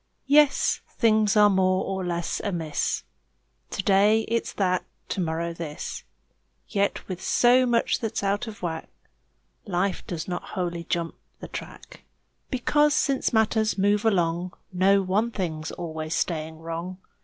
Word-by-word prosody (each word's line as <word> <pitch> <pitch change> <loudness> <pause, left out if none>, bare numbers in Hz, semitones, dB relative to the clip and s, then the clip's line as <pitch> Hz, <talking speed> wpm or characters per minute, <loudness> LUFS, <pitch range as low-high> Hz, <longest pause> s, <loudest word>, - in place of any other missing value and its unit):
Yes, 290 0 +4 0.2
things 215 -3 +3
are 210 0 +8
more 185 -1 +2
or 190 -1 -3
less 170 -1 -2
amiss; 165 - -1 0.7
To 195 - -3
day 205 +3 +4
it's 230 +1 -2
that, 185 -2 +1 0.3
to 190 - -1
morrow 170 0 -2
this; 160 -3 -6 0.6
Yet 200 0 -1
with 185 -1 -5
so 250 +1 +4
much 235 -1 +2
that's 225 -4 -3
out 205 +4 0
of 210 -4 -9
whack, 160 -2 -3 0.8
Life 185 0 -1
does 170 -2 -4
not 175 -1 -3 0.2
wholly 170 -2 -2
jump 170 -1 -2 0.3
the - - -8
track - - -9 0.5
Because, 295 +3 +2
since 275 -2 +1
matters 220 -1 +2
move 205 +2 +2
along, 175 -4 +1 0.2
No 195 +2 +4
one 205 +5 +1
thing's 160 -7 -3
always 160 -2 -4
staying 160 -2 -2
wrong. 165 +3 -5
190 Hz, 140 wpm, -26 LUFS, 170-215 Hz, 0.8 s, are